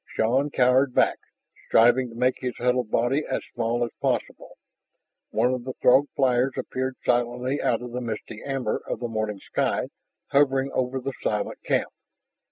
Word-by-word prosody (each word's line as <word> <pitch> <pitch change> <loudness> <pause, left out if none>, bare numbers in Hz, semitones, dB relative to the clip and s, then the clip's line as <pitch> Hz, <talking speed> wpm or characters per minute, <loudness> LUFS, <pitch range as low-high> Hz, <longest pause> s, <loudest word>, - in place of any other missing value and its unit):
Shann 130 +6 +2
cowered 130 0 +3
back, - - +3 0.5
striving 120 +2 +4
to 115 - -12
make 125 +2 +1
his 125 -2 -3
huddled 125 -2 +1
body 125 +7 +1
as - - -1
small 120 0 0
as 115 - -8
possible. - - -2 0.7
One 125 +1 +1
of 125 -1 -3
the 130 +1 -5
Throg 130 +4 +4
flyers 130 -1 +2
appeared 130 0 -3
silently 125 +3 0
out 120 +1 0
of 125 - -7
the 125 +1 -4
misty 110 -2 -6
amber 135 -5 -2
of - - -3
the 120 - -3
morning 110 -2 -2
sky, - - -1 0.4
hovering 135 -1 +3
over 130 +1 -1
the 135 +1 -4
silent 105 -1 -2
camp. - - 0
125 Hz, 165 wpm, -25 LUFS, 120-130 Hz, 0.7 s, striving